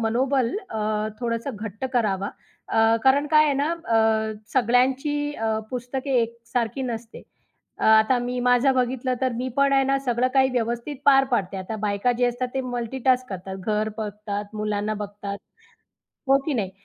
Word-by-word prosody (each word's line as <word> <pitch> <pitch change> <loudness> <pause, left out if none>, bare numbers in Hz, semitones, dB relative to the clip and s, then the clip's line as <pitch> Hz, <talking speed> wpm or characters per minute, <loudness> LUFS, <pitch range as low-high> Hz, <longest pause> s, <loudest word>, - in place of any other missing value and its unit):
मनोबल 250 - +1 0.2
अ, 220 - -3 0.4
थोडंसं 230 +1 -3
घट्ट 215 +3 -6
करावा. 200 -5 0 0.4
अ, 225 0 +4
कारण 280 +2 +4
काय 305 0 +5
आहे 290 - +2
ना, 285 +4 0
अ, 330 -10 -1 0.6
सगळ्यांची 265 +4 +2
अ, 220 -1 -1
पुस्तके 255 +2 -4
एकसारखी 235 +2 -3
नसते. 230 -2 -6 0.6
अ, - - -2
आता 220 +3 +5
मी 245 +1 -3
माझं 250 +2 +4
बघितलं, 255 0 0
तर 260 -2 +1
मी 255 +2 -2
पण 280 0 +3
आहे 270 0 +4
ना, 275 0 +2
सगळं 245 +1 +2
काही 265 -1 +5
व्यवस्थित 240 +3 -2
पार 270 -1 +6
पाडते. 195 -5 0
आता 190 +4 -5
बायका 205 +5 +1
जे 245 - +4
असतात, 245 +1 -2
ते 265 - 0
मल्टीटास्क 255 +1 0
करतात. 190 0 -6
घर 215 0 +1
बघतात, 210 -1 -4
मुलांना 210 0 -1
बघतात. 205 -1 -6 0.9
हो, 275 0 +6
की 305 - 0
नाही. 195 -5 -1
240 Hz, 160 wpm, -24 LUFS, 220-265 Hz, 0.9 s, पार